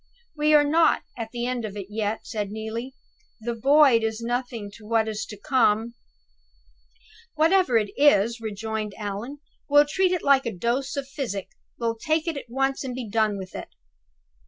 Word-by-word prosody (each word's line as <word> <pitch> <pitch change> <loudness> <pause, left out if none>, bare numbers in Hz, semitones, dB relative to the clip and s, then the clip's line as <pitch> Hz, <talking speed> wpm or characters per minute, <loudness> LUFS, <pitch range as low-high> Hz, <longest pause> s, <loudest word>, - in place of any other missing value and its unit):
"We 300 0 +3
are 295 - +7
not 320 +3 +3
at 230 -2 -5
the 240 0 -3
end 250 -1 -2
of 210 -1 -6
it 200 - -5
yet," 215 0 -2
said 210 -3 -3
Neelie. 220 +5 -5 0.4
"The 235 +2 -3
Void 270 0 +5
is 220 0 -1
nothing 235 -3 -3
to 215 - -14
what 225 -1 +2
is 215 -1 -4
to 210 - -9
come." 235 -2 +2 1.4
"Whatever 320 -4 +4
it 210 -2 0
is," 235 -5 +4
rejoined 220 -1 -4
Allan, 215 +7 -5 0.3
"we'll 290 +1 +6
treat 370 +4 +2
it 360 -3 -1
like 275 -3 +4
a - - -1
dose 240 +8 -2
of 280 -1 -3
physic 250 -9 -4 0.3
we'll 230 -1 -1
take 315 +6 0
it 330 - -1
at 275 -4 -7
once, 270 +3 0
and 255 -2 -4
be 250 -3 -5
done 215 -1 +1
with 190 -1 -8
it." - - -6
235 Hz, 180 wpm, -25 LUFS, 220-280 Hz, 1.4 s, are